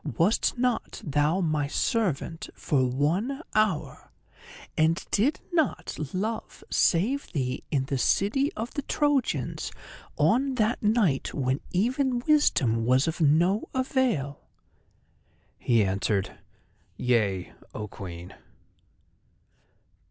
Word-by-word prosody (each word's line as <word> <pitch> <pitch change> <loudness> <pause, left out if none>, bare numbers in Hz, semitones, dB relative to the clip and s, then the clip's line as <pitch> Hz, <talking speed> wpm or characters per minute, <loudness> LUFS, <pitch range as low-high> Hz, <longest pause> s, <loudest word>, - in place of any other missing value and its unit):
Wast 200 +8 +2
not 245 -1 -1
thou 150 +5 +1
my 155 -4 0
servant 170 - -1
for 130 -4 +1
one 180 - -1
hour, 215 -7 0 0.7
and 160 +2 +2
did 250 +9 +2
not 320 -5 0 0.2
Love 215 +4 -4
save 230 +12 +2
thee 130 -5 -2
in 135 -3 0
the 135 -1 -2
city 255 - +2
of 225 +2 -5
the 285 - -2
Trojans 290 -2 0 0.5
on 265 +3 +2
that 225 0 +1
night 210 - +1
when 130 0 0
even 250 +7 +1
Wisdom 150 - +3
was 130 +5 +3
of 165 +1 -2
no 170 +8 +3
avail?" 250 - 0 1.2
He 115 -3 +3
answered: 95 +1 -1 0.6
"Yea, 105 -7 0 0.2
O 105 - -4
Queen!" 90 -2 -9
170 Hz, 105 wpm, -27 LUFS, -, 1.2 s, Wisdom